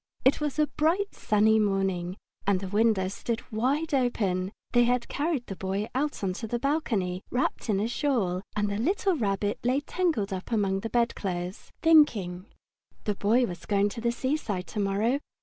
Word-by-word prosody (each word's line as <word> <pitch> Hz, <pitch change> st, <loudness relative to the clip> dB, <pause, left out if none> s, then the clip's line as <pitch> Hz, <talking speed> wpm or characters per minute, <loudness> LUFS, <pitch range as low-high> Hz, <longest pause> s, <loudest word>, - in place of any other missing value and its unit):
It 270 Hz, +3 st, +4 dB
was 295 Hz, -1 st, -2 dB
a 305 Hz, -, +4 dB
bright, 330 Hz, +7 st, 0 dB
sunny 215 Hz, +1 st, +3 dB
morning, 195 Hz, -3 st, 0 dB, 0.3 s
and 200 Hz, -2 st, +3 dB
the 190 Hz, -, -5 dB
windows 205 Hz, -2 st, +2 dB
stood 230 Hz, +1 st, -3 dB
wide 275 Hz, +8 st, 0 dB
open. 200 Hz, -8 st, +1 dB, 0.2 s
They 240 Hz, -1 st, +5 dB
had 245 Hz, 0 st, +1 dB
carried 290 Hz, -4 st, -1 dB
the 195 Hz, -, -6 dB
Boy 195 Hz, +3 st, -2 dB
out 285 Hz, -2 st, -1 dB
on 185 Hz, -2 st, 0 dB
to 225 Hz, -, -3 dB
the 240 Hz, -, -1 dB
balcony, 230 Hz, -, -1 dB
wrapped 250 Hz, -1 st, -1 dB
in 200 Hz, -2 st, +2 dB
a 215 Hz, -, 0 dB
shawl, 230 Hz, -9 st, 0 dB
and 210 Hz, 0 st, +1 dB
the 200 Hz, 0 st, -2 dB
little 375 Hz, -, +1 dB
Rabbit 205 Hz, -5 st, -1 dB
lay 255 Hz, +3 st, +2 dB
tangled 290 Hz, -, -1 dB
up 190 Hz, +5 st, -6 dB
among 195 Hz, -4 st, +1 dB
the 225 Hz, -, -4 dB
bedclothes, 190 Hz, -6 st, -2 dB
thinking. 210 Hz, -, +4 dB, 0.6 s
The 210 Hz, -, 0 dB
Boy 225 Hz, +5 st, +3 dB
was 180 Hz, -5 st, -8 dB
going 205 Hz, 0 st, +2 dB
to 230 Hz, -, -7 dB
the 235 Hz, 0 st, +1 dB
seaside 240 Hz, -8 st, -2 dB
to 210 Hz, -, -4 dB
morrow. 205 Hz, +7 st, +1 dB
220 Hz, 180 wpm, -28 LUFS, 195-260 Hz, 0.6 s, They